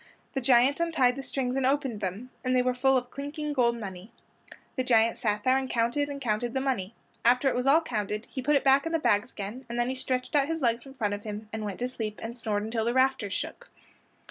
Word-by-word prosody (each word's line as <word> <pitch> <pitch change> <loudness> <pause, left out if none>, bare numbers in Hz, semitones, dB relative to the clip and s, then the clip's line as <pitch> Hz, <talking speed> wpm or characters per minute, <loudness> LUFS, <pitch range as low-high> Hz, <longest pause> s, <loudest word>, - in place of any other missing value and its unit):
The 270 - -1
giant 255 +3 +4
untied 300 -8 +2
the 275 - -5
strings 260 -2 -2
and 270 - 0
opened 265 -5 0
them, 200 +7 -4
and 255 0 +1
they 250 - +4
were 250 0 +1
full 265 +1 +3
of 250 0 -4
clinking 295 +2 -4
golden 235 -3 +2
money. 195 0 -8 0.6
The 255 - 0
giant 230 -2 +4
sat 210 -3 0
there 260 +1 +4
and 265 -1 -4
counted 240 +5 +1
and 280 -1 -5
counted 240 0 -1
the - - +2
money. 235 -6 -2 0.3
After 250 +3 +4
it - - -1
was 250 +2 -1
all 305 +4 +6
counted 210 -6 -3
he 260 - -4
put 295 +3 +2
it 280 - +3
back 275 +3 +4
in 330 - -3
the - - +4
bags 230 -5 +1
again, 210 +6 -6
and 240 +1 -3
then 240 +1 +1
he - - -1
stretched 255 -1 -2
his 295 +3 +2
legs 235 -1 +2
out 275 - -14
in 270 - -11
front 210 -5 -1
of 205 - -4
him 210 0 -7
and 220 -1 -3
went 200 -2 -4
to 245 - +1
sleep 220 -4 -4
and 230 +1 -5
snored 215 -4 -1
until 225 +1 -1
the 240 +2 0
rafters 260 -6 +2
shook. - - -5
250 Hz, 250 wpm, -28 LUFS, 220-270 Hz, 0.6 s, all